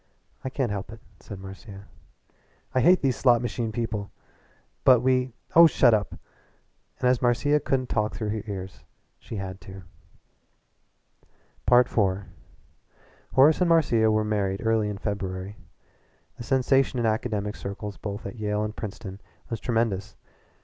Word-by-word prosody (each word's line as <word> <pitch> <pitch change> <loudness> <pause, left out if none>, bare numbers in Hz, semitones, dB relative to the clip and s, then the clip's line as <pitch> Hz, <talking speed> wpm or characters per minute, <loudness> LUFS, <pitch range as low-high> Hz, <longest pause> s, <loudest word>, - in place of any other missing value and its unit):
"I 130 - -3
can't 130 -4 -2
help 100 0 -5
it," 115 - -11 0.2
said 100 - -9
Marcia. 95 +1 -10 0.9
"I 130 - +2
hate 180 +6 +5
these 130 -3 +2
slot 120 -3 +4
machine 120 -2 -3
people!" 110 -3 -3 0.7
"But 125 -3 +6
we 130 0 +1
" - - -28
"Oh, 170 0 +10
shut 120 -5 +4
up!" 105 -3 0 0.8
And 125 - +1
as 125 -1 +2
Marcia 135 +4 +2
couldn't 130 -3 -1
talk 105 -1 -1
through 110 -2 -3
her 110 0 -2
ears 95 -2 -7 0.4
she - - -9
had 95 -2 -6
to. 95 0 -11 1.9
IV 125 0 +5 1.4
Horace 150 +6 +5
and 180 - +3
Marcia 120 -10 +4
were 110 0 +2
married 100 -1 -1
early 110 -2 +2
in 105 - -5
February. 95 -1 -4 0.8
The - - -8
sensation 135 0 +2
in 120 - 0
academic 110 -2 -1
circles 100 +1 -6
both 100 +1 -6
at - - -7
Yale 105 -1 -1
and 105 0 -4
Princeton 100 -2 -7 0.3
was 115 - -2
tremendous. 115 -5 -1
110 Hz, 145 wpm, -26 LUFS, 100-125 Hz, 1.9 s, Oh